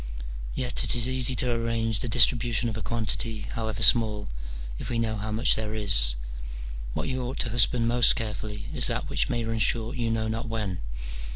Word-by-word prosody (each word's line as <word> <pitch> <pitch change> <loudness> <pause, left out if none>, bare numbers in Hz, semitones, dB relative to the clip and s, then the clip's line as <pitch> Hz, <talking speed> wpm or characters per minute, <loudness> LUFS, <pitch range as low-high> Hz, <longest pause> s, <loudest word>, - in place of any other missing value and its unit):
Yet 125 -1 0
it - - 0
is 120 0 +2
easy 130 0 +1
to 125 0 +1
arrange 115 -2 -1
the 125 - -3
distribution 120 0 +4
of 110 - -5
a 110 - -5
quantity, 110 0 -2
however 110 -2 -3
small, 105 -1 +4 0.5
if - - -6
we 120 - -1
know 115 -1 0
how 110 +1 -4
much 110 +3 +4
there 110 0 -2
is: 80 - +5 0.8
what - - -2
you 130 -1 -2
ought 125 +2 -4
to 120 - -2
husband 120 0 +2
most 120 0 +5
carefully 105 -1 -4
is - - +1
that - - -3
which 65 -4 +1
may 120 - -1
run 115 0 -2
short 115 +2 0
you 115 -2 -1
know 110 -1 -1
not 115 +2 -3
when. 105 -5 -3
115 Hz, 195 wpm, -26 LUFS, 110-120 Hz, 0.8 s, is